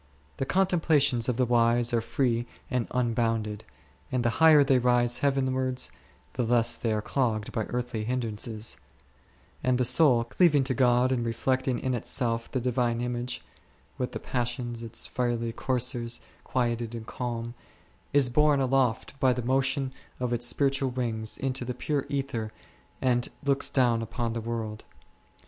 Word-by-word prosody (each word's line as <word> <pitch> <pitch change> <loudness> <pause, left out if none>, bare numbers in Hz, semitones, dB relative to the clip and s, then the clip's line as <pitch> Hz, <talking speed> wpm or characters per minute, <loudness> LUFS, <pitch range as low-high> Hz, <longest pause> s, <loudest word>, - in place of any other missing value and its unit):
The 135 - -2
contemplations 155 -10 +2
of 120 - -1
the 130 - +3
wise 120 0 +3
are 115 - +2
free 120 0 0 0.2
and 125 -2 0
un 125 -2 0
bounded, 110 -3 -1 0.5
and 125 -2 0
the 120 - +3
higher 155 -3 +8
they 135 -2 +3
rise 120 -1 +3
heavenwards, 130 -2 0 0.4
the 125 - -2
less 120 0 +2
are - - -20
they 105 - -1
clogged 110 -3 -1
by 110 - -2
earthly 120 -3 -3
hindrances; 110 - -3 0.9
and 130 -1 +2
the 125 - +2
soul, 125 -2 +5
cleaving 145 +3 +3
to 130 0 -1
God 125 0 +3
and 125 -2 0
reflecting 130 +2 0
in 130 - -2
itself 115 0 -2
the 130 - 0
Divine 120 -1 0
image 120 0 -3 0.6
(with 125 - -2
the - - -4
passions, 120 -1 -3
its 115 0 -2
fiery 120 -2 -1
coursers, 120 -1 0 0.2
quieted 120 -2 -1
and 115 -1 -7
calm), 120 -1 -4 0.6
is 140 -2 +4
borne 150 +3 +3
aloft 130 0 0
by 130 -1 +4
the 125 -1 -4
motion 135 +1 +1 0.3
of 125 -1 -1
its 120 0 +1
spiritual 135 +1 +1
wings 115 -3 -1
into 130 -1 -2
the 125 0 -4
pure 145 +1 -2
ether 130 -6 -3 0.5
and 120 -2 +2
looks 140 -1 +1
down 120 -4 +2
upon 115 +1 -3
the 115 - -3
world. 110 -2 -4
125 Hz, 155 wpm, -27 LUFS, 115-130 Hz, 0.9 s, higher